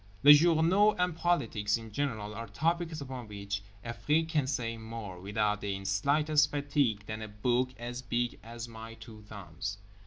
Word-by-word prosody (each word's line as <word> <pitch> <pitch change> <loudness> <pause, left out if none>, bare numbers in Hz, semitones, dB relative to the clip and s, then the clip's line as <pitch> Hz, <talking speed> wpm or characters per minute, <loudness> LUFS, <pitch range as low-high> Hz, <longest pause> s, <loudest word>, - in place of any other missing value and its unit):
Les 145 +1 +11
journaux 170 +7 +5
and 180 -2 +1
politics 115 -12 +1
in 115 -1 -10
general 110 -5 -2
are 115 +1 -6
topics 160 - -1
upon 130 -4 -6
which 100 0 -4 0.2
Afrique 150 +7 0
can 150 -5 +1
say 120 -4 -1
more, 110 -5 -7
without 105 +1 0
the 100 -1 -3
slightest 145 +10 +3
fatigue, 140 -7 0
than 110 +1 -5
a 110 - -5
book 120 +5 0
as 120 +1 -5
big 120 -1 -2
as 115 +1 -7
my 115 0 -9
two 110 -1 -12
thumbs. 95 -1 -6
115 Hz, 160 wpm, -31 LUFS, 105-145 Hz, 0.2 s, Les